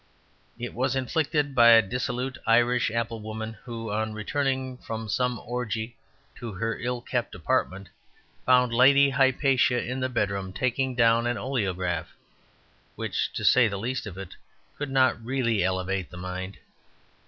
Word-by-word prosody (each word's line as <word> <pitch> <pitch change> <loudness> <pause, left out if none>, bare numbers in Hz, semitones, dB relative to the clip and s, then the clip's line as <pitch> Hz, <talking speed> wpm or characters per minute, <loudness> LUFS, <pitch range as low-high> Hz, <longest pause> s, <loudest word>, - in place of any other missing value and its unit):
It 120 0 -6
was 130 +2 0
inflicted 145 +1 0
by 120 -2 +7
a 115 -1 +8
dissolute 125 +4 -3
Irish 120 +1 +3
apple 115 0 -2
woman, 110 +1 -6
who, 115 -3 -6
on 110 +1 -2
returning 130 +3 -2
from 110 0 -6
some 125 +3 0
orgy 115 -1 -4 0.4
to 115 -3 -7
her 115 +4 -3
ill 120 0 -3
kept 120 0 -3
apartment, 100 -7 -1 0.6
found 125 -1 +4
Lady 140 +3 +6
Hypatia 130 -1 +3
in 125 +2 -4
the 130 0 -1
bedroom 100 -5 -2
taking 130 +2 -1
down 115 0 +3
an 120 0 -1
oleograph, 90 -10 -2 0.9
which, - - -2
to - - -4
say 125 -2 +6
the 100 -2 -3
least 120 +3 -3
of 95 -2 -8
it, 95 -2 -8 0.4
could 145 -1 -4
not 130 -3 +2
really 115 -5 0
elevate 95 0 -1
the 90 - -11
mind. 95 +1 -6
120 Hz, 150 wpm, -26 LUFS, 110-130 Hz, 0.9 s, a